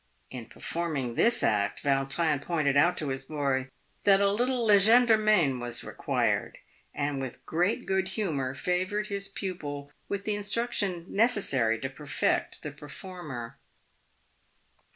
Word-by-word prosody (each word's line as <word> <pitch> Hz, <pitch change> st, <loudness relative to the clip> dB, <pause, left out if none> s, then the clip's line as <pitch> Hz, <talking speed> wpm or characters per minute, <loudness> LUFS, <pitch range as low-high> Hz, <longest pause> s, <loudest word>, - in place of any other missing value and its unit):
In 125 Hz, -4 st, -7 dB
perform 170 Hz, -2 st, -3 dB
ing 125 Hz, -3 st, -2 dB
this 235 Hz, -, +3 dB
act, 100 Hz, -1 st, +1 dB
Vautrin 140 Hz, +2 st, +1 dB
pointed 145 Hz, -2 st, 0 dB
out 175 Hz, +5 st, +4 dB
to 150 Hz, -, -2 dB
his 135 Hz, 0 st, -3 dB
boy 135 Hz, -2 st, -1 dB, 0.3 s
that 195 Hz, -1 st, +6 dB
a 200 Hz, 0 st, +3 dB
little 245 Hz, +3 st, 0 dB
legerdemain 215 Hz, -, +5 dB
was 120 Hz, 0 st, -4 dB
required, -, -, -1 dB, 0.3 s
and 140 Hz, -1 st, -2 dB
with 130 Hz, -2 st, -7 dB
great 180 Hz, +9 st, 0 dB
good 190 Hz, -1 st, 0 dB
humour 155 Hz, -, -2 dB
favoured 185 Hz, +6 st, -1 dB
his 200 Hz, -1 st, -3 dB
pupil 145 Hz, -8 st, -5 dB, 0.2 s
with 200 Hz, 0 st, -2 dB
the 210 Hz, -, -1 dB
instruction 205 Hz, -4 st, -1 dB
necessary 165 Hz, -, +2 dB
to 135 Hz, -, -1 dB
perfect 145 Hz, +2 st, -2 dB
the 150 Hz, -, -4 dB
performer. 150 Hz, -, -8 dB
170 Hz, 130 wpm, -28 LUFS, 135-200 Hz, 0.3 s, that